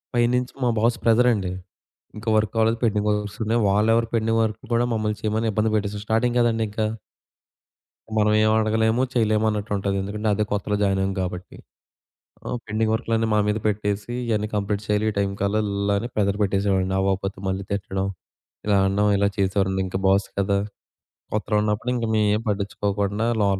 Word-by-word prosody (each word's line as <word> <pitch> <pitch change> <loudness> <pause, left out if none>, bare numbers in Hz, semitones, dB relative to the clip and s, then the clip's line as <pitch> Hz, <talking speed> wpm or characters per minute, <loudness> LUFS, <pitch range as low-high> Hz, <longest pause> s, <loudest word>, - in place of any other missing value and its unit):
పైనుంచి 125 +1 +1
మా 125 - +3
బాస్ 115 +2 +2
ప్రెషరండి. 115 -5 +3 0.7
ఇంకా 110 +1 -4
వర్కవ్వలేదు. 110 +2 +1
పెండింగ్ 105 -2 +1
వర్క్స్ 105 0 -3
ఉన్నాయి. 115 +2 +1
వాళ్ళెవరో 115 +3 +3
పెండింగ్ 115 0 +1
వర్క్ 110 -1 -2
కూడా 120 +1 +3
మమ్మల్ని 105 -1 -1
చేయమని 110 +1 0
ఇబ్బంది 110 +1 +1
పెట్టేసారు 105 -1 -2
స్టార్టింగ్ 120 +2 +1
కదండీ 115 -1 +2
ఇంకా! 110 +1 -1 1.3
మనవేం 110 0 +4
అడగలేము. 110 +2 +2
చేయలేమన్నట్టుంటది. 105 -3 0
ఎందుకంటే 105 +2 -3
అదే 105 - +1
కొత్తలో 105 0 -1
జాయిన్ 95 -1 +1
అయ్యాం 95 0 0
కాబట్టి. 90 0 -5 0.9
ఆహ్, - - -2
పెండింగ్ 110 +1 0
వర్క్‌లన్ని 115 -1 0
మా - - +3
మీద 105 +1 +1
పెట్టేసి 105 +1 -1
ఇయన్నీ 105 -2 0
కంప్లీట్ 100 0 -1
చేయాలి 105 0 +1
ఈ - - -5
టైమ్‌కల్లా 100 0 0
అని 115 +4 -4
ప్రెషర్ 100 -1 +1
పెట్టేసేవాడండి. 95 -1 +1
అవ్వకపోతే 95 0 -1
మళ్ళీ 95 +1 -2
తిట్టడం. 95 -1 -2 0.6
ఇలా 105 - +3
అనడం 100 +2 +2
ఇలా 100 0 +2
చేసేవారండి 95 0 +1
ఇంకా 95 0 -3
బాస్ 100 +1 +3
కదా! 100 0 +1 0.8
కొత్తలో 105 0 -1
ఉన్నప్పుడు 105 +3 -1
ఇంకా 115 -2 -1
మేమేం 105 0 +2
పట్టించుకోకుండా 100 +1 -1 0.2
లోలోపల 100 -1 +2
105 Hz, 150 wpm, -23 LUFS, 100-110 Hz, 1.3 s, మనవేం